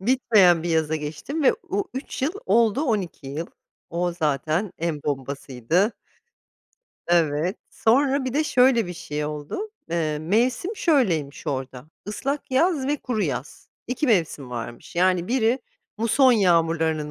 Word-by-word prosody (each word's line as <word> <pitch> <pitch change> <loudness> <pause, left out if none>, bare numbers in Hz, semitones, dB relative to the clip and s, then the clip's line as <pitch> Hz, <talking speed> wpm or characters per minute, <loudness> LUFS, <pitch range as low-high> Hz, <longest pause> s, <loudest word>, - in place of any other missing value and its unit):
Bitmeyen 200 -7 +4
bir 175 - -3
yaza 160 -1 +1
geçtim 155 - -4
ve - - +5 0.2
o 200 - 0
3 260 -1 -5
yıl 305 +6 +1
oldu 230 +2 +3
12 200 - -2
yıl. 150 +5 -4 0.4
O 175 +1 -1
zaten 160 +3 -1
en 160 -3 -2
bombasıydı. 140 - -1 1.1
Evet, 170 +1 +2
sonra 270 +4 +2
bir 255 - -2
de 305 +1 +2
şöyle 250 -5 +4
bir 180 - -5
şey 150 -2 -4
oldu. 150 - -5 0.2
Eee, 155 -3 0
mevsim 240 - 0
şöyleymiş 175 - +1
orada: 130 -2 -4 0.2
Islak 275 +7 -3
yaz 285 +1 +2
ve 290 +2 +1
kuru 240 -6 -2
yaz, 135 -3 -4 0.2
2 255 +5 -1
mevsim 165 - +1
varmış. 120 +4 -7
Yani 180 0 +2
biri 245 0 +2 0.4
muson 255 +4 +4
yağmurlarının 165 -6 +2
180 Hz, 135 wpm, -24 LUFS, 155-250 Hz, 1.1 s, ve